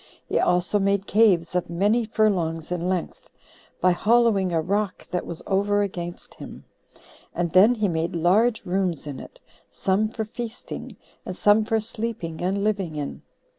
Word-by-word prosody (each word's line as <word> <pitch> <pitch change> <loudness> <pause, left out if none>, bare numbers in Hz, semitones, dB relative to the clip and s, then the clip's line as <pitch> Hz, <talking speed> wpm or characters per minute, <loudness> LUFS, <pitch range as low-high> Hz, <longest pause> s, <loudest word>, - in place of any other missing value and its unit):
He - - 0
also 180 +3 +2
made 200 0 +1
caves 195 -7 +3
of 180 -1 -1
many 205 +7 +1
furlongs 180 -7 0
in 180 0 -1
length, 185 -2 -4 0.5
by 185 - +4
hollowing 205 -1 +3
a 165 - +1
rock 200 +4 -2
that 180 - -2
was 170 - 0
over 205 +1 +1
against 175 -3 -6
him; - - -11 0.7
and 170 -1 -1
then 205 +8 +6
he 215 -3 0
made 165 -1 -2
large 210 +8 +2
rooms 180 -4 -1
in 145 -3 -6
it, - - -12 0.3
some 200 +3 0
for 220 -1 -4
feasting, 235 +1 -7 0.3
and 185 - -7
some 210 +1 +4
for 225 0 +1
sleeping 215 -7 -5
and 195 +3 -1
living 195 -7 -1
in. 145 -1 -5
195 Hz, 160 wpm, -24 LUFS, 175-215 Hz, 0.7 s, then